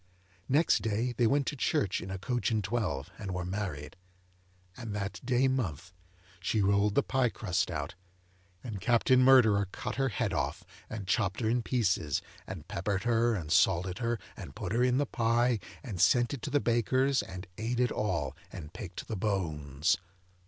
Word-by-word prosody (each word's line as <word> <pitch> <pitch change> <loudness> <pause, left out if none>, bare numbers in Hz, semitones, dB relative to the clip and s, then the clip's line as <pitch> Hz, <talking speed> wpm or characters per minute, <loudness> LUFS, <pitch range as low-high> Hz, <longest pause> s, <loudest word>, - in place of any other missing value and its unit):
Next 150 +5 +4
day 115 +3 -1
they 120 0 +3
went 140 +3 +2
to 145 - -2
church 100 -7 0
in 90 - -7
a 95 - -3
coach 120 +6 -1
and 110 -2 0
twelve, 90 - -2
and 95 -3 -4
were 90 -1 -3
married. 90 -7 -4 0.8
And 110 -2 -6
that 100 -1 -4
day 125 +1 +2
month, 95 - -2 0.5
she 100 +5 0
rolled 100 +1 +2
the 140 - +4
pie 130 -2 +1
crust 90 -5 -1
out, - - -4 0.7
and 105 -6 -6
Captain 125 +1 +4
Murderer 110 -7 +6
cut - - -5
her 135 -1 +2
head 110 - -1
off, - - -2 0.3
and 110 -3 -5
chopped 95 -1 +1
her 110 - +1
in 120 +1 +1
pieces, 95 - 0 0.2
and - - -7
peppered 95 +2 -2
her, 120 0 +2
and 80 -6 -5
salted 90 +1 +3
her, 120 -1 0 0.2
and - - -9
put 90 - -4
her 115 +3 +2
in 125 0 +3
the 145 - +2
pie, 120 -1 +2 0.2
and 105 -10 -4
sent 120 +2 +4
it 135 - -5
to - - -4
the 145 +1 +2
baker's, 130 +3 +2
and 90 0 -8
ate 120 +2 -1
it 125 -1 +2
all, 85 -10 -1 0.2
and 75 -2 -9
picked 90 -4 -7
the 110 - -3
bones. 80 -8 0
110 Hz, 180 wpm, -30 LUFS, 95-120 Hz, 0.8 s, Murderer